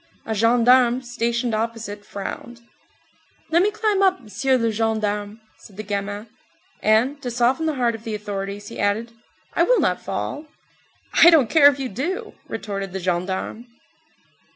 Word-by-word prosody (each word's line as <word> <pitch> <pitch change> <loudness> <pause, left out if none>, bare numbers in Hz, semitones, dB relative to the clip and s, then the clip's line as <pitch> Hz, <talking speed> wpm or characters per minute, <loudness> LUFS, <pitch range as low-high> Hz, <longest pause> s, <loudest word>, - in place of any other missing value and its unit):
A 220 - -2
gendarme 240 +3 +4
stationed 235 0 -1
opposite 220 -2 -3
frowned. 235 +5 -7 0.9
"Let 340 +2 +4
me 405 - +3
climb 425 -2 0
up, 375 -1 +3
m'sieu 260 +4 0
le 230 -2 0
gendarme," 215 -1 -1 0.2
said 195 - -16
the 215 - -5
gamin. 205 +1 -4 0.6
And, 240 +7 +2
to 250 - -4
soften 245 +6 +1
the 310 - -1
heart 240 -3 +1
of 225 -1 -9
the 225 -2 -4
authorities 205 0 -5
he - - -9
added: 210 +3 0 0.4
"I - - +1
will - - +4
not - - +1
fall." 300 +1 -4 0.7
"I 340 - +8
don't 290 -10 +4
care 295 -3 +7
if 285 -1 +4
you 270 -2 -3
do," 360 - -4
retorted 195 -4 -5
the 190 - -3
gendarme. 185 +6 -3
230 Hz, 155 wpm, -22 LUFS, 205-260 Hz, 0.9 s, I